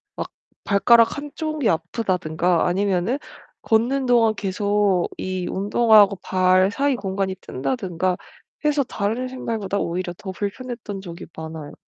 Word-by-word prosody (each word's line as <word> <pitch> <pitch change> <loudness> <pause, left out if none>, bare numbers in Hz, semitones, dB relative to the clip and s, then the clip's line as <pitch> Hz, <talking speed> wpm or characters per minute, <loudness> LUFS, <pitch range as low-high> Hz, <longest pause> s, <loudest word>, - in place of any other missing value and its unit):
막 - - -4 0.3
발가락 230 +4 +4
한쪽이 295 -2 -2
아프다든가 175 -1 0
아니면은 195 +6 0 0.4
걷는 245 +5 +2
동안 230 -3 +4
계속 200 -1 +1
이 185 -1 -3
운동화하고 205 0 +4
발 185 +1 +3
사이 280 +3 +1
공간이 195 -3 -2
뜬다든가 165 +7 -2 0.5
해서 295 -1 +3
다른 230 +1 -2
신발보다 225 -6 -3
오히려 175 +1 -2
더 190 - -6
불편했던 205 +1 -5
적이 170 -2 -9
많아요. 160 -2 -7
200 Hz, 300 characters per minute, -22 LUFS, 185-235 Hz, 0.5 s, 발가락